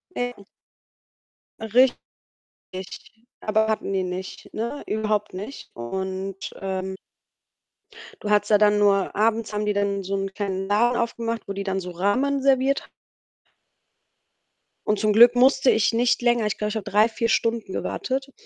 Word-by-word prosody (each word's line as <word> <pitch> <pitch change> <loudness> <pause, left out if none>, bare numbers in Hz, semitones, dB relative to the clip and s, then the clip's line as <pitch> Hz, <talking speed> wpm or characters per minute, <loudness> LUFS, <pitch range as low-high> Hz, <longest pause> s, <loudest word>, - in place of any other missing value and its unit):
Ne. 245 0 -2 2.2
Richtig, 190 +4 -11 0.2
aber 220 0 +1
hatten 215 -2 -1
die 190 -1 0
nicht, 180 +1 -7
ne, 235 +6 -4
überhaupt 215 -2 -1
nicht. 210 +9 -8
Und, 190 +9 -5
ähm 190 0 -3 1.3
Du 210 - -3
hattest 210 - +3
da 210 - +6
dann 210 0 +4
nur 200 -2 +2
abends 220 0 +1
haben 210 0 -1
die 210 - +2
dann 200 -1 0
so 195 +1 -3
'n 195 0 -3
kleinen 195 -2 -3
Laden 235 +4 +2
aufgemacht, 230 -1 -3
wo 200 - -3
die 200 - -4
dann 190 -1 -1
so 180 -1 -6
Ramen 245 +11 0
serviert 270 +1 +2
h - - -16 2.0
Und 210 -1 +1
zum 215 - +3
Glück 240 +3 +7
musste 265 +1 +4
ich 220 -4 +3
nicht 245 +2 +2
länger 240 -2 +2
ich 210 - -1
glaube, 210 - -2
ich 215 - -3
habe 210 - -5
3, 215 +3 +4
4 230 +1 -1
Stunden 225 -2 0
gewartet. 270 +1 -3
210 Hz, 155 wpm, -24 LUFS, 195-235 Hz, 2.2 s, Glück